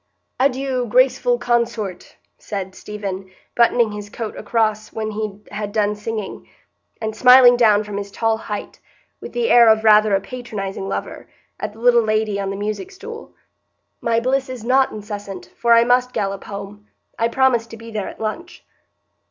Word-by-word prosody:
"Adieu, 260 -1 0
'graceful 250 +1 +3
consort,'" 235 -6 -2 0.2
said 190 -3 -5
Stephen, 195 -2 -6 0.3
buttoning 235 -1 +3
his 205 0 -7
coat 220 +1 -6
across 215 0 -1
when 215 -1 -4
he 210 -1 -4
had 210 -1 -4
done 210 -1 +1
singing, 210 -1 -6 0.5
and 220 -1 -4
smiling 250 +1 +8
down 215 -3 +4
from 205 -1 -6
his 200 0 -5
tall 225 +2 0
height, 210 -2 -7 0.4
with - - -9
the 475 -1 0
air 235 -2 +7
of 220 0 +4
rather 215 -1 +5
a - - +2
patronizing 195 -4 -6
lover, - - -5 0.3
at - - -4
the 220 - -16
little 240 0 +5
lady 215 -2 0
on 195 -1 -2
the 195 - -3
music 215 - -4
stool. 445 +4 -10 0.7
"My 230 0 +1
bliss 260 +2 0
is 255 -3 -7
not 260 +3 +3
incessant, 205 -3 -8
for 235 -1 +3
I 230 0 +6
must 250 +1 +2
gallop 195 -1 -3
home. 205 +1 -8 0.3
I 230 - +3
promised 235 -2 +2
to 225 - -10
be 230 0 -11
there 210 -3 -3
at - - -12
lunch." 275 +11 -5
220 Hz, 170 wpm, -20 LUFS, 205-245 Hz, 0.7 s, smiling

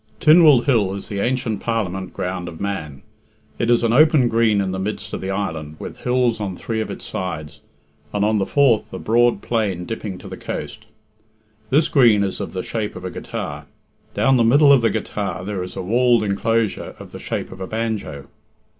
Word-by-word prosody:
X. - - -13
Tynwald 155 -5 +7
Hill 105 -8 +2
is 100 - -8
the 100 - -3
ancient 120 -2 -1
Parliament 95 -5 -2
ground 90 -1 -4
of 85 -2 -9
Man. 75 -9 -4 0.6
It 115 - 0
is 120 0 +3
an 115 0 +2
open 150 -2 +5
green 115 -3 +3
in 95 -1 -1
the 95 - -3
midst 105 +3 -4
of - - -4
the 95 - -4
island, 80 -6 -3
with - - -8
hills 125 -2 +1
on 95 -4 -4
three 110 -1 -3
of - - -4
its - - -7
sides, 75 -5 -5 0.5
and 105 0 0
on 110 0 +2
the 95 - -1
fourth 135 -6 +2
a - - -4
broad 120 -1 +2
plain 100 -7 -1
dipping 105 -3 -5
to - - -11
the - - -8
coast. - - -6 0.8
This 150 +4 +3
green 115 -7 +5
is 95 - -3
of 95 -5 -5
the 90 -1 -3
shape 110 -2 -4
of 90 - -8
a 90 - -4
guitar. - - -6 0.5
Down 135 -1 +3
the 120 - +4
middle 140 +5 +6
of 135 - +5
the 115 - +3
guitar 95 -4 -3
there 100 -2 -3
is 90 - -6
a - - -4
walled 120 +3 +3
enclosure 110 +2 -1
of - - -12
the - - -9
shape - - -4
of 95 - -10
a 95 - -4
banjo. 110 -11 -3
105 Hz, 205 wpm, -21 LUFS, 95-120 Hz, 0.8 s, Tynwald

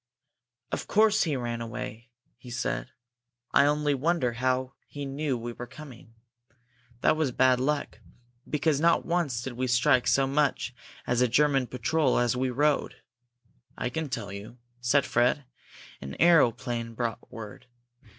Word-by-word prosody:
"Of - - -3
course 215 0 +4
he 155 -4 0
ran 120 -2 -3
away!" 115 +1 -6 0.3
he 125 +1 -13
said. 120 0 -3 0.6
"I 140 - +5
only 150 0 +1
wonder 140 -3 0
how 130 +2 -1
he 145 -1 -6
knew 140 -1 -2
we 120 +1 -6
were 120 +1 -8
coming! 125 -3 -13 0.9
That - - +4
was 155 -4 0
bad 130 0 +3
luck 145 +2 -1 0.5
because 150 -1 +1
not 170 +1 +3
once 160 -9 -1
did 130 - -5
we 130 +2 -2
strike 125 0 +3
so 135 - +4
much 140 -2 0 0.3
as 120 0 +1
a 125 - +4
German 135 +1 +2
patrol 130 +6 +1
as 120 0 +2
we 130 +1 0
rode." 145 +4 +1 0.8
"I - - -2
can 160 0 -3
tell 115 -5 -4
you," 100 +4 -9 0.2
said 130 +3 +2
Fred. 125 +3 +1 0.6
"An 70 0 -7
aeroplane 120 -8 +3
brought 120 0 -4
word. 110 0 -9
130 Hz, 150 wpm, -28 LUFS, 120-145 Hz, 0.9 s, I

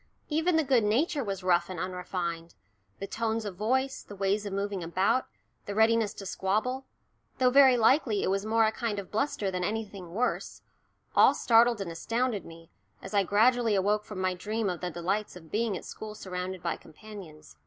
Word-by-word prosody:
Even 320 +3 +1
the 320 - +3
good 260 -5 +3
nature 275 +7 +1
was 195 -3 -4
rough 175 -1 +2
and 185 -3 -5
unrefined 175 -2 -4 0.4
the 195 - -5
tones 225 +1 -2
of 200 -3 -5
voice, 260 +7 0
the 205 - -11
ways 200 +2 0
of 200 - -5
moving 200 -2 -2
about, 190 +9 +1 0.4
the 200 - -4
readiness 220 -1 +3
to 195 - -8
squabble, 215 +8 -1 0.5
though 255 -1 +4
very 265 -2 +7
likely 230 -2 +3
it - - +1
was 195 0 0
more 225 +1 +3
a 220 - +2
kind 225 -2 -3
of 200 -2 -6
bluster 215 -3 -1
than 180 -1 -2
anything 200 -4 -4
worse, 250 +3 -2 0.5
all - - +6
startled 235 -1 +4
and 180 -3 -4
astounded 230 +4 -1
me, 165 0 -13 0.3
as - - -9
I 200 - +4
gradually 225 +3 +3
awoke 205 +2 +1
from 210 -3 -8
my 185 0 +1
dream 210 +2 -2
of 175 - -6
the 180 - -2
delights 185 +6 -2
of 160 -3 -13
being 215 -2 0
at - - -10
school 215 -1 -8
surrounded 185 -2 -5
by 170 - -1
companions. 160 - -12
205 Hz, 190 wpm, -29 LUFS, 185-230 Hz, 0.5 s, very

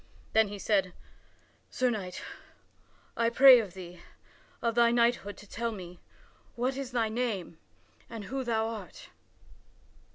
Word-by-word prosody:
Then 220 -1 +5
he 205 0 -7
said: 195 -3 0 0.8
"Sir 255 -1 +1
Knight, 185 -5 -5 0.9
I 230 0 +2
pray 255 0 +8
thee 180 -3 -9 0.6
of 230 -1 0
thy 235 0 +4
knighthood 235 -3 +1
to 210 - -14
tell 230 +3 -3
me 180 -4 -9 0.6
what 255 +2 -1
is 270 -2 -5
thy 235 -2 +1
name 215 -8 -3 0.5
and 230 -2 -7
who 265 +5 -4
thou 225 -2 0
art." 215 -6 -8
225 Hz, 130 wpm, -29 LUFS, 195-240 Hz, 0.9 s, pray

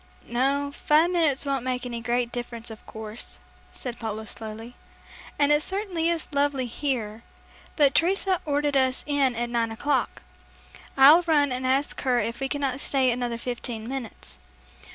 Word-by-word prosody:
"No, 275 +4 0
five 310 +4 +3
minutes 315 -6 +2
won't 275 -3 -1
make 250 -1 -2
any 235 -1 -4
great 240 0 0
difference, 235 -1 -6
of 220 - -11
course," 220 +1 -7 0.3
said 245 -2 -7
Paula 220 -1 -4
slowly, 225 +3 -8 0.6
"and 290 0 +4
it 295 0 +4
certainly 370 -3 -1
is 335 -2 -1
lovely 280 -2 +1
here, 230 -4 -3 0.5
but 285 -3 +4
Teresa 375 +1 +2
ordered 290 -1 0
us 260 -1 +2
in 280 -4 +2
at 240 +1 -2
nine 230 -1 0
o'clock. 285 +6 -1 0.7
I'll 290 +6 +9
run 290 -4 +3
and 255 +1 -2
ask 270 +2 0
her 250 -2 +2
if 230 +2 -3
we 270 0 -2
cannot 275 -2 -1
stay 265 -3 +2
another 240 -1 -2
fifteen 235 -2 -5
minutes." 255 -4 -7
260 Hz, 155 wpm, -25 LUFS, 235-285 Hz, 0.7 s, I'll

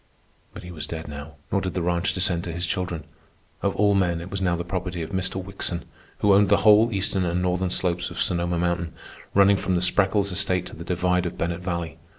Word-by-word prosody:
But - - -10
he 90 - -8
was 80 -4 -6
dead 80 -1 -6
now, 75 +1 -8 0.2
nor 100 - +2
did 95 -2 -4
the 90 - 0
ranch 85 +1 +1
descend 90 -2 0
to 85 - -4
his 85 +2 -2
children. 85 -2 -2 0.6
Of 100 - 0
all 105 0 +4
men, 90 -4 +1
it 85 +3 -8
was 100 -1 -3
now 90 -2 +2
the 85 - -3
property 90 -1 -3
of 80 - -7
Mr. 95 -1 -1
Wickson, 95 -2 -3 0.4
who 105 -1 +5
owned 100 0 +5
the 100 - +6
whole 110 +2 +7
eastern 95 -1 0
and 85 0 0
northern 90 0 0
slopes 90 -1 0
of - - -7
Sonoma 85 0 0
Mountain, 85 -1 -1 0.4
running 100 0 +6
from 95 -1 0
the - - +2
Spreckels 100 +2 +2
estate 90 -1 0
to - - -9
the 85 - -8
divide 90 0 +1
of - - -7
Bennett 85 +1 -2
Valley. 85 -3 -4
90 Hz, 225 wpm, -24 LUFS, 85-95 Hz, 0.6 s, whole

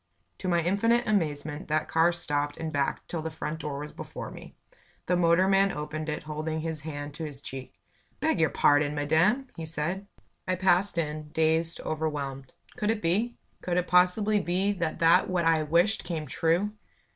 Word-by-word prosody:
To - - -4
my 170 -2 +2
infinite 230 +7 +2
amazement, 155 -5 -1
that 155 0 0
car 165 +1 +4
stopped 145 -4 -1
and 160 -1 -4
backed 140 -1 -1
till 165 - -3
the 160 - -3
front 160 0 -5
door 150 -2 -4
was 150 +1 -6
before - - -7
me. - - -11 0.5
The 180 - +2
motorman 190 +3 +4
opened 155 0 -4
it. 150 - -3
holding 155 +1 -3
his 160 -2 -3
hand 145 -2 -6
to 160 - -6
his 145 -3 -6
cheek. 135 -5 -8 0.4
"Beg 310 - +1
your 160 -2 +4
pardon, 145 0 +3
madam!" 165 - +2
he 165 - -5
said. 170 +6 -3 0.4
I 185 - +1
passed 185 +1 +2
in, 155 -2 -2
dazed, 160 +1 +1
overwhelmed. 145 -4 -3 0.2
Could 210 - 0
it 220 -1 0
be? 210 +9 +1 0.2
Could 175 -1 -1
it 180 - +2
possibly 195 +4 +4
be 190 +2 0
that 170 -5 -2
that 165 +2 +4
what 180 -2 +1
I 165 -1 +4
wished 170 +8 +2
came 160 -3 -3
true. 170 +7 +1
165 Hz, 180 wpm, -28 LUFS, 150-185 Hz, 0.5 s, car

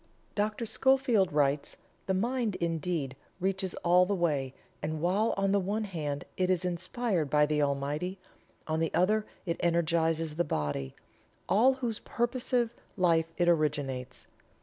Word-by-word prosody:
Dr. 215 +2 -1
Schofield 250 -4 +3
writes: 145 -1 +1 0.3
"The 190 - +1
mind, 230 0 0
indeed, 165 -4 -2 0.2
reaches 190 0 -1
all 180 +1 +5
the 200 - +1
way, 145 -7 0 0.3
and 155 +1 -3
while 190 +7 +2
on 195 0 +2
the 200 - +3
one 205 +4 -1
hand 150 -8 -4
it 185 0 +1
is 185 -1 +1
inspired 180 - -1
by 150 +1 +4
the 150 0 +1
Almighty, 145 +6 -1 0.5
on 160 0 -1
the 165 -1 0
other 210 +4 +2 0.2
it 170 -2 -1
energizes 165 -2 +1
the 170 +3 +1
body, 75 - -2 0.5
all 245 +7 +5
whose 240 -4 -3
purposive 240 -1 -1 0.2
life 165 -3 +3
it 175 - +2
originates. 145 -6 0
175 Hz, 145 wpm, -30 LUFS, 150-205 Hz, 0.5 s, all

